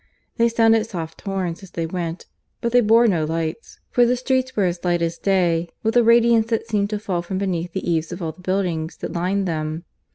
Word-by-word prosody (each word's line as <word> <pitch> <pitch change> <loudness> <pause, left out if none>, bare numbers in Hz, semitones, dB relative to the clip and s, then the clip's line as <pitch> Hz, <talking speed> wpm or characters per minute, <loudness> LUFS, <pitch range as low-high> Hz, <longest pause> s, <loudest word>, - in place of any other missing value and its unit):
They 235 -1 +4
sounded 225 -1 +3
soft 165 -5 -6
horns 190 -3 -3
as 195 - -12
they 170 -2 -3
went, 170 0 -4 0.3
but 235 - -1
they 245 +1 +5
bore 230 +2 +5
no 175 -8 +2
lights, 160 +6 -4
for 245 - +4
the 240 +1 +3
streets 260 0 -1
were 205 - +2
as 175 -1 -1
light 175 -1 +1
as 165 0 -2
day 175 -4 +1
with 225 +1 0
a 240 - +7
radiance 230 -1 +5
that 230 -1 -1
seemed 205 -3 0
to 210 - -2
fall 190 -4 -2
from 185 +2 -4
beneath 175 -3 -2
the 190 - -4
eaves 165 -1 0
of 175 - -5
all 165 -3 -3
the 180 - -18
buildings 180 -4 -2
that - - -6
lined 185 +3 0
them. 155 0 -3
190 Hz, 225 wpm, -22 LUFS, 170-225 Hz, 0.3 s, a